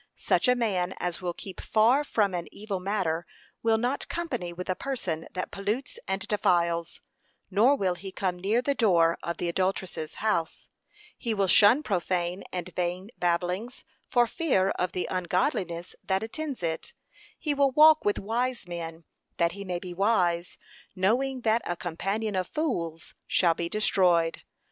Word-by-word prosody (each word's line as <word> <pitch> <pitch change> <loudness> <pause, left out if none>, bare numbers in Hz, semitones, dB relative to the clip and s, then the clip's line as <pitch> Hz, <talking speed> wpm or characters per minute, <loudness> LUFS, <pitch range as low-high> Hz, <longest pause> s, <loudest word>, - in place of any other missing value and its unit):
Such - - +1
a 250 - +5
man 195 -7 0
as 180 +1 -3
will 175 -1 -3
keep 190 - -8
far 235 +7 +4
from 210 -9 +1
an 175 -1 -3
evil 205 -2 -4
matter 180 -4 -1 0.3
will 225 -1 +3
not 245 +5 -1
company 255 - -3
with 180 +1 -7
a 185 - +1
person 190 -13 -3
that 185 - -4
pollutes 210 +7 -3
and 190 +1 -2
defiles, 170 -4 +1 0.5
nor 240 +8 +5
will 190 -8 +1
he 190 +2 -8
come 185 -2 -2
near 215 +7 +1
the 280 - +1
door 170 -9 +3
of 170 - -3
the 175 - -2
adulteress's 185 -2 -2
house; 210 -7 -1 0.5
he 230 -2 -1
will 200 -1 +2
shun 215 +9 +6
profane 180 - -1
and 180 -1 -5
vain 180 +4 -2
babbling, 180 +5 0 0.4
for 245 -1 +4
fear 230 - +1
of 180 0 -2
the 180 - -2
ungodliness 180 - -1
that 190 +1 0
attends 275 - -5
it; 160 -1 -3 0.4
he 300 -3 -1
will 280 -1 +3
walk 310 +3 +7
with 205 - +1
wise 235 +1 -2
men 165 -1 -6 0.3
that 170 0 +2
he 200 - -7
may 180 -2 -3
be 180 0 -7
wise, 180 -3 +1 0.4
knowing 250 +8 +1
that 225 0 +2
'a 175 - -2
companion 195 +6 -2
of 185 -1 0
fools 170 - -3
shall 170 -3 +3
be 170 +1 -3
destroyed.' 175 -5 +2
190 Hz, 165 wpm, -28 LUFS, 175-225 Hz, 0.5 s, walk